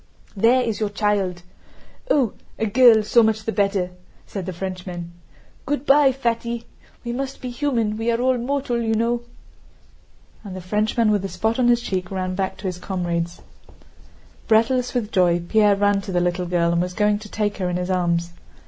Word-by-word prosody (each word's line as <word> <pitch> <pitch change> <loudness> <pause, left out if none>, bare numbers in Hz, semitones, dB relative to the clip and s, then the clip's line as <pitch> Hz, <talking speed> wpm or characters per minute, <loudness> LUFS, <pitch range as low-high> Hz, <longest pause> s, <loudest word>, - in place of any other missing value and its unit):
"There 235 +5 +4
is 225 -3 -2
your 215 -2 0
child! 200 -4 -1 0.7
Oh, 265 - +2 0.2
a 225 - 0
girl, 230 0 +6
so 235 +3 +4
much 220 -1 +1
the 225 - -2
better!" 195 -4 0 0.3
said 195 -3 -6
the - - -2
Frenchman. 180 -1 -6 0.6
"Good 290 0 -1
by, 280 -1 +5
Fatty. 235 -2 -2 0.4
We 235 - -3
must 270 +2 -4
be 250 - -5
human, 240 -5 -1
we 225 +1 -1
are 230 0 +1
all 255 0 +2
mortal 250 -1 -1
you 225 -1 0
know!" 235 +2 0 1.2
and 195 -3 -8
the - - -5
Frenchman 215 +4 +1
with 205 -2 +2
the 195 - -4
spot 220 +4 -1
on 245 - +3
his 240 0 +4
cheek 185 -4 -3
ran 185 -1 -3
back 190 0 -2
to - - -13
his 180 -1 -4
comrades. 175 -2 -3 1.1
Breathless 240 +3 +2
with 225 -3 -1
joy, 175 -3 +3
Pierre 210 -1 +4
ran 205 0 +2
to 195 -1 -7
the 180 - +1
little 175 0 -1
girl 170 -1 +1
and 170 0 +1
was 180 0 -3
going 210 -1 +2
to 210 0 -11
take 205 -1 -2
her 185 -2 -1
in 175 - -1
his 180 +1 -2
arms. 170 -2 0
210 Hz, 190 wpm, -22 LUFS, 185-235 Hz, 1.2 s, girl